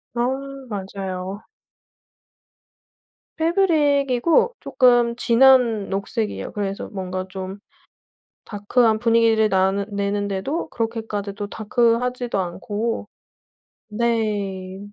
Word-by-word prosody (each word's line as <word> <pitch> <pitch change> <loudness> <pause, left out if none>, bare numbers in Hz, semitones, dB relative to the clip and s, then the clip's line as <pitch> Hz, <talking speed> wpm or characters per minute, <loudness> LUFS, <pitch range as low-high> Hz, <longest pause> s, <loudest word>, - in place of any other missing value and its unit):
아 240 0 +1 0.4
맞아요. 195 -1 -5 1.9
패브릭이고 320 - +2
쪼끔 245 -3 +3
진한 240 -3 +4
녹색이에요. 200 +2 -3
그래서 200 -1 -4
뭔가 185 -1 -4
좀 190 +1 -6 0.9
다크한 220 +1 +1
분위기를 225 -2 +3
나는 195 +1 +1
내는데도 200 - -2
그렇게까지 225 -3 -3
또 205 0 -5
다크하지도 235 +2 0
않고 205 +5 -3 0.8
네 210 -4 -2
220 Hz, 205 characters per minute, -22 LUFS, 195-240 Hz, 1.9 s, 진한